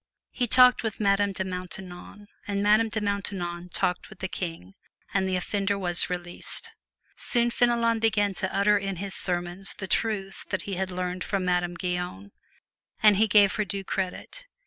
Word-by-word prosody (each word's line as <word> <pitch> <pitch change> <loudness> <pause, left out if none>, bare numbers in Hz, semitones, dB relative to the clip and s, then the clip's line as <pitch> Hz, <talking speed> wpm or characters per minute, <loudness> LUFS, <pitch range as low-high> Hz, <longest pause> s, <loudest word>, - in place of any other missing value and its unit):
He 245 - -1
talked 250 +2 +7
with 220 -3 -4
Madame 200 -1 +2
de 190 0 -2
Maintenon, 185 +2 -8 0.2
and 200 0 -1
Madame 215 +2 +4
de 220 - -2
Maintenon 190 -4 -3
talked 180 +1 -1
with 215 - -13
the 190 - -4
King, 165 - -6 0.4
and 190 -1 +1
the 185 - 0
offender 200 +2 -1
was 175 -3 +3
released. 175 -1 -3 0.4
Soon 240 0 +2
Fenelon 235 -1 +2
began 215 -3 +2
to 190 0 -2
utter 205 +1 +3
in 195 -1 -3
his 195 +2 -5
sermons 175 +1 -2
the 190 - -5
truths 195 -2 -1 0.2
he 200 - -5
had 190 +1 -2
learned 180 0 -3
from 195 -2 -2
Madame 175 -1 0
Guyon. 180 - -4 0.7
And 210 -2 +7
he 220 +2 +4
gave 205 -1 +5
her 215 - +2
due 200 0 -4
credit. 190 - -4
195 Hz, 170 wpm, -26 LUFS, 180-210 Hz, 0.7 s, talked